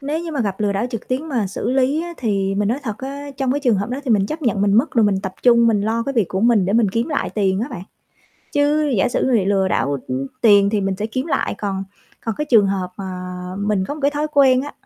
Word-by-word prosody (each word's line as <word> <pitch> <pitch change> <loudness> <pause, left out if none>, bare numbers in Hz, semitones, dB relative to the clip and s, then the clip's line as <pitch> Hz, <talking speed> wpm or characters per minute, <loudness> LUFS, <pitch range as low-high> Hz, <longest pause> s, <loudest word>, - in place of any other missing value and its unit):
Nếu 295 +4 -2
như 330 - -5
mà 280 - -1
gặp 200 -3 -2
lừa 205 -1 +1
đảo 200 +4 -1
trực 230 - -6
tuyến 265 +5 -2
mà 235 -8 0
xử 205 +5 -3
lý 270 +4 +1
á 345 0 -6
thì 195 -4 -1
mình 205 0 0
nói 245 +5 0
thật 215 -5 -5
á, 280 +2 -6
trong 265 -2 0
cái 285 - -1
trường 245 -7 +2
hợp 200 +3 -2
đó 260 - -3
thì 255 - -2
mình 200 -3 +3
chấp 310 +5 -5
nhận 205 -5 +1
mình 200 - +2
mất 230 +9 +3
rồi 230 -3 +3
mình 195 -2 +1
tập 190 -1 -5
trung 235 -1 +5
mình 220 -3 +3
lo 225 +3 0
cái 275 +4 -3
việc 225 -8 +1
của 190 - -2
mình 230 -4 +4
để 195 - 0
mình 225 -1 +3
kiếm 230 +7 -1
lại 290 - -1
tiền 195 -2 0
á 240 - -2
bạn. 185 -7 -6 0.7
Chứ 290 +1 +2
giả 190 - +2 0.2
mà 260 - +1
bị 220 -6 +3
lừa 195 -1 +1
đảo, 140 -5 0
ưm, 130 +2 -2
tiền 205 -4 +5
thì 215 - 0
mình 195 -1 -1
sẽ 210 +3 -2
kiếm 255 +6 -3
lại, 305 - -1
còn 195 -2 -3 0.4
còn 225 -2 -2
cái 300 - 0
trường 220 -5 +6
hợp 185 -2 -2
mà 190 -1 -5 0.5
mình 205 -2 0
có 290 - -4
một 305 - -9
cái 280 - +3
thói 295 +1 -2
quen 265 -3 +5
á 290 - -7
225 Hz, 285 wpm, -20 LUFS, 195-270 Hz, 0.7 s, trường